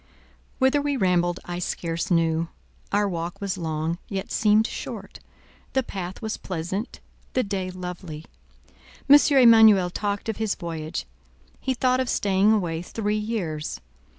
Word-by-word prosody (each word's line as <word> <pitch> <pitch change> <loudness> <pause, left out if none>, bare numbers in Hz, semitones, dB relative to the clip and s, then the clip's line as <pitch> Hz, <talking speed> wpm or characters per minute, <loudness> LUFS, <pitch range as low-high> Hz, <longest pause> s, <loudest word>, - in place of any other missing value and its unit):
Whither 265 +2 +3
we 285 -1 -1
rambled, 175 -3 +2
I 175 0 -4
scarce 170 +1 -3
knew. 165 -1 +2 0.4
Our 205 0 +2
walk 175 +1 -4
was 200 -2 -2
long, 160 -1 -2
yet 195 -1 -4
seemed 215 0 +4
short; - - -6 0.5
the 265 - +2
path 190 -1 -6
was 220 0 -2
pleasant, 190 +6 -4 0.3
the 255 - +2
day 195 -2 -3
lovely. 180 -3 -7 0.8
M. 280 - +9 0.2
Emanuel 220 -7 +7
talked 205 +2 -2
of 220 - -2
his 220 -2 -1
voyage—he 170 +9 -6
thought 255 +1 +2
of 260 -2 -1
staying 200 +1 +3
away 175 -6 0
three 210 +3 -2
years. 205 -9 -3
190 Hz, 135 wpm, -25 LUFS, 170-220 Hz, 0.8 s, M